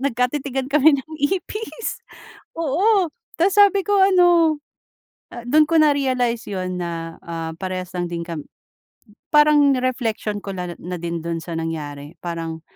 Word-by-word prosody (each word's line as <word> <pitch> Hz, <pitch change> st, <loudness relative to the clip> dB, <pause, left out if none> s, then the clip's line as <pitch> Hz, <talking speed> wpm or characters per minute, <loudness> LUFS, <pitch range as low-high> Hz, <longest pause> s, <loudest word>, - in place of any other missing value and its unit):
nagkatitigan 265 Hz, +1 st, -1 dB
kami 300 Hz, +2 st, +5 dB
ng 270 Hz, -, -9 dB, 0.2 s
ipis 425 Hz, +4 st, -4 dB, 0.5 s
oo 355 Hz, +5 st, +2 dB, 0.3 s
tas 385 Hz, +3 st, +3 dB
sabi 405 Hz, -1 st, +6 dB
ko 405 Hz, +2 st, +1 dB
ano 350 Hz, -4 st, +5 dB, 0.9 s
dun 305 Hz, +5 st, +4 dB
ko 330 Hz, -, +2 dB
narealize 260 Hz, -6 st, +2 dB
yun 185 Hz, -2 st, -3 dB
na, 165 Hz, -1 st, -5 dB
ah, 165 Hz, -1 st, -5 dB
parehas 185 Hz, -1 st, -4 dB
lang 175 Hz, -1 st, -2 dB
din 170 Hz, -1 st, -4 dB
kam 165 Hz, -2 st, -5 dB, 1.0 s
parang 295 Hz, -2 st, +6 dB
reflection 235 Hz, -5 st, -2 dB
ko 195 Hz, -1 st, -7 dB
na 180 Hz, -1 st, -5 dB, 0.3 s
din 170 Hz, 0 st, -3 dB
dun 165 Hz, -1 st, -3 dB
sa 165 Hz, -1 st, -5 dB
nangyari. 150 Hz, -2 st, -5 dB
Parang, 165 Hz, -2 st, -5 dB
245 Hz, 130 wpm, -21 LUFS, -, 1.0 s, sabi